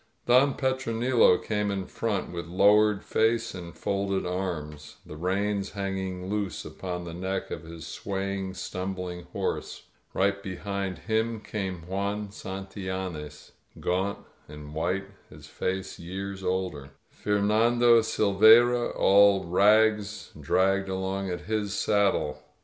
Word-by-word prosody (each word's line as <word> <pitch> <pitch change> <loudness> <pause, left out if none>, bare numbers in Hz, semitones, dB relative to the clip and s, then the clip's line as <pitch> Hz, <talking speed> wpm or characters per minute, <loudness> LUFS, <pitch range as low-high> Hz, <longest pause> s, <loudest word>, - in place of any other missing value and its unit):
Don 130 +3 +5
Petronilo 125 -5 +3
came 105 -1 -2
in 95 -2 -2
front, 105 -2 -2
with 85 -1 -5
lowered 105 +3 +4
face 115 +1 +1
and 85 -2 -9
folded 100 -1 -1
arms, 80 -5 -4
the 75 - -9
reins 100 +4 -1
hanging 95 -2 -3
loose 100 -5 -3
upon 90 -2 -5
the 85 -1 -7
neck 95 +3 -3
of - - -4
his 80 0 -9
swaying, 95 +2 -4
stumbUng 90 -2 -5
horse. 90 - -4 0.3
Right 100 +1 +1
behind 100 0 -4
him 110 0 -1
came 95 -5 -5
Juan 100 +3 -2
Santillanes, 95 -6 -6 0.3
gaunt 95 +3 0 0.3
and 75 0 -10
white, 90 +5 -1 0.2
his - - -13
face 95 +1 -4
years 95 +2 -6
older. 90 -7 -2 0.2
Fernando 115 +3 +3
Silveyra, 110 +4 +5
all 100 0 +5
rags, 105 +3 +3
dragged 95 +1 +1
along 95 +1 -2
at 90 -1 -3
his 105 +1 -2
saddle. 100 -9 +1
95 Hz, 120 wpm, -27 LUFS, 90-105 Hz, 0.3 s, Don